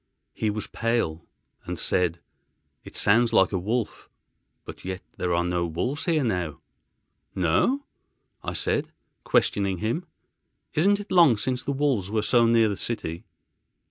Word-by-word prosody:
He 110 - -1
was 105 0 -3
pale, 115 -9 -1 0.4
and - - -4
said, 85 -2 0 0.6
"It - - -12
sounds 115 +3 +4
like 95 -3 +5
a 95 - 0
wolf—but 110 +4 -6
yet 95 0 -5
there 90 - -1
are 85 0 +2
no 90 -1 0
wolves 125 - -2
here 160 -4 +2
now." 90 - -2 0.8
"No?" 95 - +2 0.6
I - - -3
said, - - -1 0.3
questioning 100 -2 +1
him; 115 - -2 0.7
"isn't 200 +6 +3
it 205 - -9
long 165 -11 +6
since 125 +4 -1
the 140 - -3
wolves 135 -9 0
were 110 0 0
so 115 +2 +4
near 115 -1 +4
the 100 -2 -2
city?" 100 -4 -4
110 Hz, 140 wpm, -26 LUFS, 90-125 Hz, 0.8 s, long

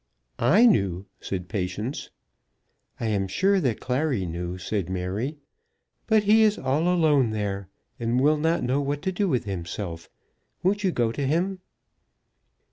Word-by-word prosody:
"I 215 +9 +5
knew," 100 - +2
said 90 -2 -4
Patience. 100 - -3 0.9
"I - - -3
am 100 -3 0
sure 195 - +2
that 125 - 0
Clary 130 -5 0
knew," 90 +1 -4
said 95 -1 -3
Mary. 95 - -3 0.7
"But 220 -2 +4
he 215 +2 +5
is 215 -1 +4
all 150 +6 0
alone 150 -8 +3
there, 100 -3 -3 0.3
and 120 +1 +1
will 150 +3 +4
not 160 +3 +1
know 130 +3 +1
what 145 +1 -2
to 190 - 0
do 195 +1 0
with 125 -5 +1
himself. 85 -3 -5 0.5
Won't 205 +3 +1
you 190 - +2
go 120 -7 +1
to 140 +3 -2
him?" 180 +6 0
125 Hz, 150 wpm, -25 LUFS, -, 0.9 s, I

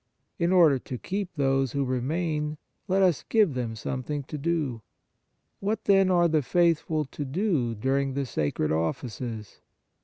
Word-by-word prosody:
In 170 +1 +2
order 165 -7 +5
to 125 - -6
keep 195 - -3
those 135 -3 +1
who 140 -1 0
remain, 150 +4 -1 0.3
let 190 +1 +3
us 180 -5 +2
give 210 -9 +4
them 120 -3 -3
something 135 +5 -4
to 150 +3 -6
do. 145 -7 -1 0.8
What, 210 +3 -2
then, 195 -2 +4
are 175 -2 +4
the 155 -2 +2
faithful 160 +1 +1
to 145 - -6
do 140 - 0
during 135 +4 0
the 140 -1 -1
sacred 75 - -1
offices 105 +7 -3
145 Hz, 150 wpm, -27 LUFS, 130-170 Hz, 0.8 s, order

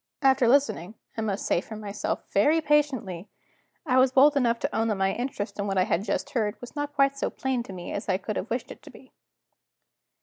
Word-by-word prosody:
After 265 -2 +4
listening 230 -7 +2 0.2
(I 225 - -3
must 205 -2 -2
say 175 - +2
for 220 - -9
myself) 210 -1 -4
very 295 +11 +4
patiently, 270 - 0 0.6
I 255 -3 +3
was 255 0 +4
bold 285 +3 +6
enough 240 -4 +2
to - - -2
own 225 +1 +1
that 215 - +1
my 195 0 +1
interest 240 -5 -4
in 200 - -1
what 195 -1 -1
I 185 - +5
had 185 +1 0
just 205 - -2
heard 220 -5 -1
was 245 - -11
not 290 0 -4
quite 275 0 +2
so - - 0
plain 265 -2 -2
to 235 - -9
me 180 -2 -7
as 200 - -5
I 185 - +2
could 200 +2 -5
have 205 - -4
wished 240 +2 -3
it - - -11
to - - -13
be. - - -16
230 Hz, 230 wpm, -26 LUFS, 200-270 Hz, 0.6 s, bold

